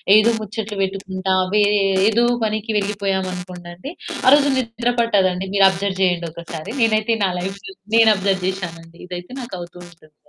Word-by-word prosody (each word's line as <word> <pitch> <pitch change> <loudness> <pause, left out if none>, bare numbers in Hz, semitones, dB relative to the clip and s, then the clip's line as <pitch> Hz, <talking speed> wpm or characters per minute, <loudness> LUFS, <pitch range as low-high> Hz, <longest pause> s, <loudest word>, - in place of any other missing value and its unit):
ఏదో 215 +2 +6
ముచ్చట్లు 215 0 -5
పెట్టుకుంటా, 190 -1 -2 0.7
ఏదో 230 +2 +2 0.2
పనికి 215 +1 -2
వెళ్లిపోయామనుకోండి 185 - -4 0.4
ఆరోజు 285 +1 +6
నిద్ర 235 -1 -1
పట్టదండి. 190 -5 +1
మీరు 200 -1 +6
అబ్జర్వ్ 190 0 -3
చేయండొకసారి. 170 +1 -3
నేనైతే 225 0 +2
నా - - +1
లైఫ్‌లో 200 - -7 0.2
నేను 225 -1 +7
అబ్జర్వ్ 195 -1 0
చేశానండి. 170 -3 -7
ఇదైతే 180 +3 -8
నాకు 240 -6 -7
అవుతూ 175 +1 -10
ఉంటుంది. 155 -3 -22
195 Hz, 130 wpm, -20 LUFS, 180-215 Hz, 0.7 s, నేను